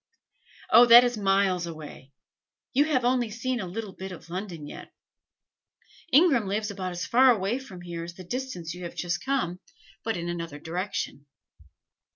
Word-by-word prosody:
"Oh, 240 +1 +8
that 240 +1 +10
is 245 0 0
miles 195 -3 +1
away. 150 -4 -10 0.6
You 285 +3 +4
have 260 -6 +1
only 245 -2 +2
seen 240 +3 -2
a 190 - -4
little 205 +2 -6
bit 190 +1 -7
of 170 -1 -11
London 180 -4 -5
yet. - - -10 1.2
Ingram 270 - +5
lives 210 +2 -1
about 185 -2 -4
as 175 - -4
far 255 +2 +5
away 220 +1 +1
from 220 -10 -11
here 170 -1 -6
as 170 0 -8
the 185 - -10
distance 180 -6 -5
you 180 - -10
have 170 - -7
just 175 0 -2
come, 265 -10 -1 0.4
but 225 -3 -1
in 170 0 -4
another 170 -3 -4
direction." 165 -3 -4
195 Hz, 170 wpm, -27 LUFS, 175-240 Hz, 1.2 s, that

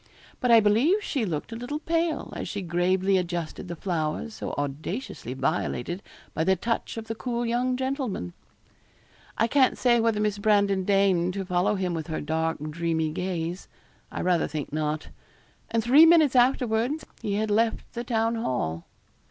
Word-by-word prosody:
But 250 - 0
I 230 -1 +8
believe 245 - +3
she 270 - -1
looked 165 +2 -4
a - - -5
little 245 +6 -4
pale 330 0 -1
as - - -4
she 200 -2 -4
gravely 185 +2 +2
adjusted 175 -1 -4
the 170 - -5
flowers 170 +5 -2
so - - -5
audaciously 145 - -4
violated 135 +5 -2 0.3
by 160 - 0
the 190 +2 +3
touch 230 +5 -2
of 225 - -5
the 225 - -4
cool 240 +1 -3
young 250 +2 0
gentleman. 260 - -3 1.0
I - - +3
can't 260 +2 +3
say 240 -2 +3
whether 225 -2 +1
Miss 210 -1 0
Brandon 200 -2 +2
deigned 190 -3 +2
to 195 -1 -3
follow 180 +2 +1
him 185 -2 -1
with 160 -1 -4
her 160 - -3
dark, 160 +2 -1
dreamy 160 -1 -1
gaze. 175 +1 -3 0.4
I - - -4
rather 175 -2 +2
think 145 -1 -5
not. 155 0 -2 0.6
And 230 -1 0
three 280 +8 +7
minutes 315 -5 +5
afterwards 250 +2 +2 0.2
he 205 -3 -1
had 215 0 0
left 225 +2 0
the 235 - -4
Town 230 -1 0
Hall. 120 - -2
200 Hz, 170 wpm, -26 LUFS, 170-235 Hz, 1.0 s, I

